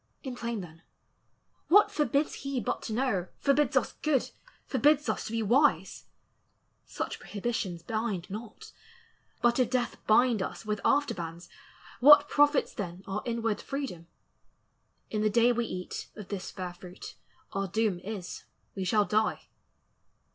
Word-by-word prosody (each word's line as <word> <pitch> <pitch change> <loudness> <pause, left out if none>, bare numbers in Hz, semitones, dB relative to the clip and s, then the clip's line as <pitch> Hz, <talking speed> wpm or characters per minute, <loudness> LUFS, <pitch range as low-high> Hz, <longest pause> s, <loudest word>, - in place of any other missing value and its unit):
In 260 -3 -5
plain 235 -3 -3
then, 165 -2 -12 0.9
what 410 +3 +6
forbids 300 -4 +1
he 275 -2 -2
but - - -2
to 220 - -5
know, 220 -7 0
Forbids 285 +1 +2
us - - +1
good, 295 -5 +1 0.3
forbids 295 +2 +3
us - - -1
to - - -5
be 230 -1 -1
wise? 265 +8 +2 0.8
Such - - -4
prohibitions 200 -5 -3
bind 215 -3 -2
not. 215 +3 -8 0.7
But 240 +1 +4
if 250 -3 +3
death 250 -1 -1
Bind 230 0 +4
us 205 - -5
with 210 -1 -2
after 285 +1 +3
bands, 170 0 -7 0.5
what 290 +3 +8
profits 290 0 +3
then 180 -2 -6
Our 200 +2 -3
inward 230 -3 -1
freedom? 270 - -5 1.0
In 215 - -1
the 215 - +3
day 235 +3 +4
we 240 0 0
eat 180 0 -6
Of 210 -3 -9
this 195 -3 -4
fair 180 -1 -6
fruit, 180 0 -10 0.4
our 195 0 -1
doom 210 -1 0
is, 195 -2 -7 0.3
we 190 - -3
shall 205 +3 +3
die. 215 +1 0
225 Hz, 145 wpm, -29 LUFS, 190-260 Hz, 1.0 s, what